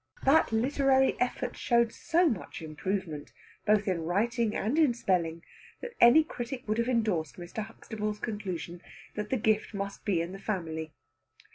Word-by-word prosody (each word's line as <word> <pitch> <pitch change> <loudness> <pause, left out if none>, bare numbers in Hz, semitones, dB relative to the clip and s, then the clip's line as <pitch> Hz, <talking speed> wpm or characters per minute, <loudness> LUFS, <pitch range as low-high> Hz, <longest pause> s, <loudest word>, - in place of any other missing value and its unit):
That 280 -1 +4
literary 265 +3 +3
effort 250 - -1
showed 235 -1 +2
so 345 +2 +2
much 210 - -3
improvement, 160 -1 -4 0.4
both 210 -1 +3
in 180 -3 0
writing 215 +6 0
and 245 +10 0
in 285 -7 +4
spelling, 170 -6 0 0.4
that 485 -1 -7
any 240 +7 +8
critic 250 -4 -6
would 215 +2 0
have 235 +2 +1
endorsed 210 - 0
Mr. 175 +5 -5
Huxtable's 215 -1 -5
conclusion 185 -6 -5 0.3
that 210 0 -4
the 260 - +1
gift 215 -1 +1
must 200 0 -5
be 195 -5 +1
in 170 +2 -2
the 195 - -8
family. 160 -6 -3
215 Hz, 155 wpm, -29 LUFS, 180-240 Hz, 0.4 s, any